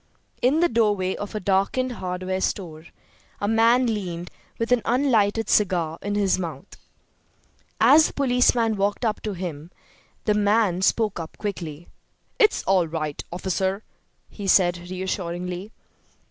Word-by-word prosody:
In 280 +6 +3
the 345 - +5
doorway 205 - +1
of 205 +1 -7
a - - -1
darkened 200 +7 0
hardware 185 -3 -3
store 165 -5 -3 0.5
a 205 - -1
man 230 +3 +4
leaned, 180 -6 -3 0.3
with 230 +1 -3
an 250 -2 +4
unlighted 225 -4 +2
cigar 175 -5 +1
in 205 0 -3
his 195 -2 +2
mouth. 165 0 -7 1.0
As 315 +1 +6
the - - -10
policeman 245 -4 +2
walked 205 +4 0
up 215 -2 -1
to 210 - -3
him 170 -4 -6 0.6
the 210 - +3
man 205 -3 +2
spoke 210 0 +1
up 165 -1 -8
quickly. 170 -6 -5 0.5
"It's 430 -1 +3
all 185 -3 +2
right, 155 -2 -4
officer," 190 +3 -2 0.4
he 200 -2 -8
said, 175 -2 +3
reassuringly. 180 +1 -4
195 Hz, 135 wpm, -24 LUFS, 180-225 Hz, 1.0 s, As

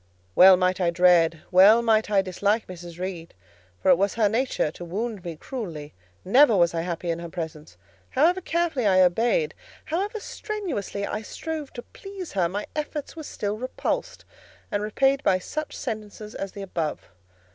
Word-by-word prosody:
Well 185 - +8
might 185 +1 +1
I 175 - +3
dread, 170 -2 +4
well 200 +6 +7
might 220 -2 +2
I 200 -2 +3
dislike 200 +4 0
Mrs. 175 -2 -10
Reed; 180 -2 -6 0.5
for 185 - +5
it 175 - +5
was 200 0 +1
her 220 -2 +3
nature 225 - 0
to 175 - -10
wound 205 +3 -4
me 170 -2 -5
cruelly; 160 - -7 0.3
never 240 +2 +5
was 170 -1 +3
I 165 - -1
happy 170 0 -3
in 165 - -3
her 170 0 -7
presence; 160 -3 -7 0.3
however 340 +7 +2
carefully 330 - 0
I 185 -1 +5
obeyed, 235 - +2 0.3
however 395 +7 -2
strenuously 355 - -4
I 210 - -3
strove 310 +5 -6
to 240 - -7
please 390 -3 -9
her, 180 -3 +1
my 205 +3 -4
efforts 300 0 -4
were 325 - -7
still 210 -8 -4
repulsed 255 +1 -3 0.5
and 205 - 0
repaid 270 +6 +1
by 185 - +3
such 305 +11 -5
sentences 215 -2 -6
as 195 -1 -5
the 200 - -7
above. 165 -5 -3
200 Hz, 170 wpm, -25 LUFS, 180-260 Hz, 0.5 s, Well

